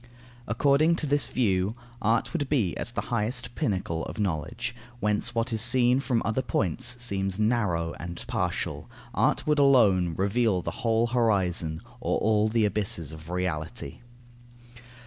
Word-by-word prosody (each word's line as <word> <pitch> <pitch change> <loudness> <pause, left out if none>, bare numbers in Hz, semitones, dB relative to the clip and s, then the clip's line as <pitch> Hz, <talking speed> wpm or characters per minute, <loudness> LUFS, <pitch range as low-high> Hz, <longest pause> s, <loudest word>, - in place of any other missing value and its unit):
According 140 +7 +3
to 165 - -1
this 145 0 +1
view, 100 -3 0 0.3
art 115 +2 +1
would 145 -6 -2
be 115 - +1
the 120 +4 -4
highest 120 +2 -2
pinnacle 95 - -2
of - - -7
knowledge, 105 +6 -2 0.2
whence 105 +3 +1
what 115 +1 0
is 110 - +1
seen 120 +1 +4
from 125 -4 0
other 115 +3 0
points 110 +3 -1
seems 100 -5 -2
narrow 105 -7 +1
and 85 0 -7
partial; - - -3 0.2
art - - +1
would 150 -1 +2
alone 100 - +4
reveal 100 -1 +1
the - - -3
whole 115 -1 +2
horizon 95 -8 +1 0.2
or 125 - 0
all 110 0 +2
the 110 -1 +2
abysses 95 -7 -2
of 80 +1 -11
Reality. 90 +2 -3
110 Hz, 145 wpm, -27 LUFS, 90-120 Hz, 0.3 s, seen